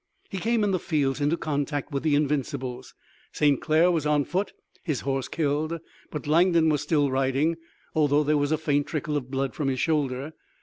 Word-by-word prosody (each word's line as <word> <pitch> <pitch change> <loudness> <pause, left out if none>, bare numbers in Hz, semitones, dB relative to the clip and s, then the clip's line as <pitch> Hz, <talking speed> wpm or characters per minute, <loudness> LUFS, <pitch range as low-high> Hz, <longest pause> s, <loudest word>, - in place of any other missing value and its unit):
He 195 - -3
came 225 +3 +1
in 205 - +2
the 185 - +1
fields 145 -4 0
into 150 +4 +2
contact 145 -1 -2
with 140 -1 -1
the 155 -2 +2
Invincibles. 140 -3 -2 0.4
St. 145 -3 +2
Clair 165 +3 +4
was 165 -4 0
on 150 -1 +2
foot, 185 +6 -1 0.3
his 155 -7 -2
horse 135 -1 -2
killed, 155 +1 -1 0.3
but 150 - -6
Langdon 165 +1 +4
was 150 -2 +1
still 145 -2 +1
riding, 135 +5 +1 0.4
although 150 -1 +3
there 150 +1 +2
was 145 +1 0
a 155 - +3
faint 145 -2 0
trickle 155 -1 -2
of 130 -3 -3
blood 135 0 -2
from 150 - -2
his 130 -1 0
shoulder. 145 -2 -1
150 Hz, 190 wpm, -26 LUFS, 140-160 Hz, 0.4 s, Clair